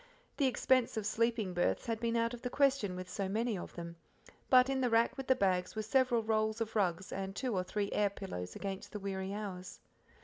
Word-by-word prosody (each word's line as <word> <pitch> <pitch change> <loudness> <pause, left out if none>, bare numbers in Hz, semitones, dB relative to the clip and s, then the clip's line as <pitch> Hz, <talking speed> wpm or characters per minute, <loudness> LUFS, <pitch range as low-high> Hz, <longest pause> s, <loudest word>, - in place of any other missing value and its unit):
The 280 - +3
expense 255 -2 +2
of 215 - -2
sleeping 225 -3 0
berths 175 0 +1
had 230 -1 -2
been 235 0 0
out 230 +1 +1
of 240 - -7
the 250 - -3
question 270 -9 +2
with 185 0 -6
so 190 +1 -3
many 225 +2 0
of 180 - -7
them; 170 -1 -7 0.5
but 255 0 +7
in 270 -1 0
the 250 - +2
rack 230 0 +3
with 270 -1 -6
the 260 - +5
bags 185 -4 +1
were 215 - -2
several 245 0 +2
rolls 220 0 +1
of 225 -1 -3
rugs 190 -3 0
and 195 0 -4
two 250 -3 -1
or 185 - +1
three 200 +2 -2
air 205 -1 +2
pillows 90 - -6
against 195 -1 -5
the 210 - -4
weary 190 -1 -3
hours. 195 -3 -6
215 Hz, 225 wpm, -34 LUFS, 190-235 Hz, 0.5 s, but